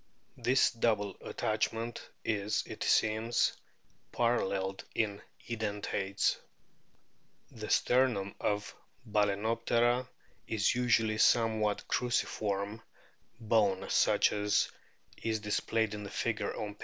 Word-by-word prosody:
This 130 +2 +3
double 110 -3 0
attachment 115 +2 -2 0.2
is, 105 -1 0
it - - -9
seems, 110 +2 +2 0.6
paralleled 95 -5 0
in 105 -2 -1 0.3
Edentates. 105 -3 -1 1.1
The 110 -2 -7
sternum 120 -6 +2
of 105 0 -1 0.3
Bal&noptera 115 +4 +1 0.4
is 110 -3 +2
usually 120 -3 +2
a - - -5
somewhat 110 -3 +3
cruciform 105 -3 -1 0.6
bone 105 -4 +2
such - - +4
as 105 0 +1 0.5
is 110 -1 -1
displayed 110 +1 0
in 105 0 -5
the 100 - -6
figure 110 -1 -1
on 105 -1 -4
p. 105 - -28
110 Hz, 100 wpm, -32 LUFS, 105-115 Hz, 1.1 s, such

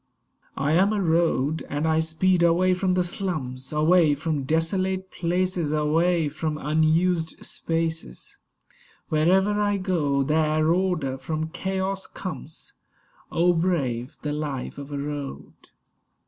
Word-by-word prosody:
I 140 +2 0
am 190 +6 +4
a 210 - 0
Road; 160 -4 +1
and 145 +3 -1
I 160 0 +3
speed 160 +3 +1
away 175 +2 +4
from 185 0 +1
the 180 - +2
slums, 155 -9 -3
Away 155 0 +4
from 145 -2 -2
desolate 185 +5 0
places, 180 -2 -1
Away 160 +2 +2
from 155 +1 -3
unused 160 +3 +1
spaces; 165 - -3 0.7
Wherever 190 +7 +3
I 205 -1 +1
go, 155 -8 0
there 155 +2 +2
order 175 -8 -1
from 155 +3 -3
chaos 190 +3 -2
comes. 180 -4 -7 0.6
Oh, 175 +1 +3
brave 140 -8 -1
the 150 -1 -2
life 145 -3 -4
of 140 +1 -8
a 145 - -3
Road! 145 -1 -5
160 Hz, 125 wpm, -25 LUFS, 150-180 Hz, 0.7 s, am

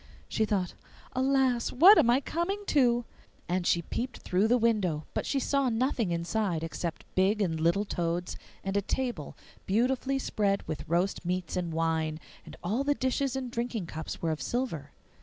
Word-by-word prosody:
She 220 - +1
thought, 190 -4 -1 0.4
'Alas! 260 -2 +2
what 365 +10 +8
am 255 -7 +4
I 250 +3 +4
coming 345 +8 -2
to?' 245 -7 +3 0.4
and 180 +1 0 0.3
peeped 250 +2 -2
through 190 +4 +2
the 245 +2 +4
window; 205 -10 +1
but - - -2
she 275 - +1
saw 275 0 +1
nothing 235 -3 0
inside 170 0 -1
except 165 0 -4
big 195 +3 +3
and 165 -6 0
little 170 +6 +2
toads, 175 -1 -2 0.3
and 195 0 -3
a 200 - +3
table 240 - -3 0.3
beautifully 255 +6 +1
spread 200 -6 0
with 155 - -5
roast 175 +4 +1
meats 180 -1 -2
and 175 -2 -2
wine, 160 -1 0 0.3
and - - -9
all 215 +10 0
the 290 +1 +2
dishes 260 0 0
and 260 -2 -3
drinking 235 -4 -2
cups 160 +1 -6
were 165 - +1
of 155 - -3
silver. 225 - -2
210 Hz, 170 wpm, -29 LUFS, 170-255 Hz, 0.4 s, what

